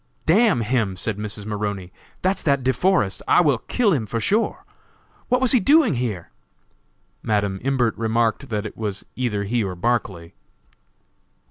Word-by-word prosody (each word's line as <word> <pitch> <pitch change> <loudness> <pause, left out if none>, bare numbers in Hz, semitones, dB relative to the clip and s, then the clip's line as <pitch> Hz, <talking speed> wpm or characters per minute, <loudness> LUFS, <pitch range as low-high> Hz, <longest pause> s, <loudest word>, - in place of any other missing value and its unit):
"D 160 - +4
n 215 - +4
him," 110 -4 0
said 105 +2 -4
Mrs. 105 -1 -6
Maroney, 100 -3 -4 0.3
"that's 190 +2 +1
that 140 -3 +1
De 130 +1 +2
Forest; 175 - +1
I - - +5
will 145 -8 +2
kill 220 - +1
him, 115 -8 -1
sure! 120 - 0 0.6
What 250 0 +3
was 260 - +3
he 255 - +5
doing 285 - +4
here?" 115 -9 -3 0.9
Madam 100 -3 -1
Imbert 130 -3 +1
remarked 115 +4 0
that 105 -1 -2
it 105 - -7
was 105 -3 -5
either 115 -5 -1
he 115 +3 0
or 95 -2 -4
Barclay. 95 -5 -2
115 Hz, 155 wpm, -22 LUFS, 105-140 Hz, 0.9 s, I